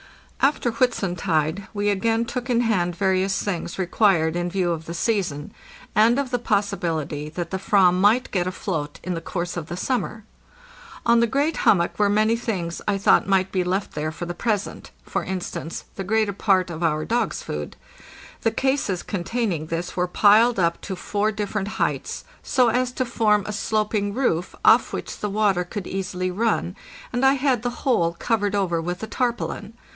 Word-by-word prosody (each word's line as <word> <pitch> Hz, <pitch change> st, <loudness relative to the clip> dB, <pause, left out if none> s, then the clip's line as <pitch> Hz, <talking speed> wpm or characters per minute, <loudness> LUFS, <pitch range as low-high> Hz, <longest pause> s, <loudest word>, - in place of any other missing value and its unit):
After 270 Hz, -3 st, +2 dB
Whitsuntide 185 Hz, -, 0 dB
we 205 Hz, 0 st, +1 dB
again 225 Hz, +3 st, +1 dB
took 250 Hz, +1 st, -5 dB
in 240 Hz, -1 st, +3 dB
hand 180 Hz, -7 st, +1 dB
various 190 Hz, 0 st, +1 dB
things 180 Hz, -4 st, -3 dB
re 190 Hz, -, 0 dB
quired 175 Hz, -4 st, +3 dB
in 175 Hz, 0 st, -1 dB
view 180 Hz, -1 st, 0 dB
of 160 Hz, -1 st, -4 dB
the 170 Hz, -, -5 dB
season, 170 Hz, -7 st, -1 dB, 0.4 s
and 225 Hz, +4 st, +4 dB
of 275 Hz, -2 st, -1 dB
the 245 Hz, -, 0 dB
possibility 165 Hz, -9 st, -1 dB
that 170 Hz, +1 st, -5 dB
the 190 Hz, -, -2 dB
/vam 195 Hz, -3 st, +4 dB
might 205 Hz, +7 st, +3 dB
get 180 Hz, -2 st, 0 dB
afloat 165 Hz, -5 st, -4 dB
in 185 Hz, -, -2 dB
the 165 Hz, -, -4 dB
course 175 Hz, 0 st, -4 dB
of 165 Hz, -3 st, -5 dB
the 175 Hz, -, -5 dB
summer. 220 Hz, -1 st, -2 dB, 0.8 s
On 235 Hz, 0 st, +5 dB
the 235 Hz, -, +3 dB
great 285 Hz, +7 st, 0 dB
hummock 175 Hz, -1 st, +2 dB
were 205 Hz, -1 st, +4 dB
many 215 Hz, +2 st, +3 dB
things 185 Hz, -8 st, -3 dB
I 205 Hz, -1 st, +2 dB
thought 195 Hz, -, +4 dB
might 190 Hz, -1 st, +2 dB
be 185 Hz, -2 st, +1 dB
left 190 Hz, +3 st, -1 dB
there 155 Hz, +1 st, -2 dB
for 175 Hz, -, -6 dB
the 175 Hz, -, -4 dB
present 210 Hz, +2 st, -2 dB
— -, -, -34 dB
for -, -, -2 dB
instance, 175 Hz, -3 st, -5 dB
the 195 Hz, -, -4 dB
greater 215 Hz, +1 st, +1 dB
part 190 Hz, -3 st, +2 dB
of 165 Hz, 0 st, -6 dB
our 155 Hz, -2 st, +1 dB
dogs' 235 Hz, -2 st, -1 dB
food. 75 Hz, 0 st, -5 dB, 0.7 s
The -, -, +3 dB
cases 225 Hz, -6 st, 0 dB
containing 190 Hz, -4 st, -2 dB
this 170 Hz, +2 st, -4 dB
were 180 Hz, 0 st, +1 dB
piled 215 Hz, +5 st, +5 dB
up 170 Hz, -2 st, +1 dB
to 190 Hz, -, -5 dB
four 205 Hz, +3 st, -1 dB
different 210 Hz, -1 st, -3 dB
heights -, -, -1 dB, 0.2 s
so 250 Hz, -3 st, +3 dB
as 250 Hz, +2 st, +1 dB
to 255 Hz, -, -1 dB
forma 210 Hz, -3 st, +1 dB
sloping 210 Hz, -1 st, -1 dB
roof 180 Hz, -10 st, 0 dB
off -, -, +6 dB
which -, -, -5 dB
the 210 Hz, -, -2 dB
water 200 Hz, -3 st, +2 dB
could 180 Hz, +2 st, -6 dB
easily 185 Hz, -1 st, -3 dB
run, 205 Hz, -2 st, 0 dB, 0.4 s
and 245 Hz, +1 st, 0 dB
I 265 Hz, 0 st, +6 dB
had 265 Hz, -4 st, +1 dB
the 245 Hz, -, -1 dB, 0.2 s
whole 170 Hz, -11 st, +2 dB
covered 205 Hz, +2 st, 0 dB
over 175 Hz, -4 st, 0 dB
with. 180 Hz, +6 st, -4 dB
tarpaulin. 235 Hz, -3 st, -2 dB
200 Hz, 180 wpm, -23 LUFS, 175-225 Hz, 0.8 s, off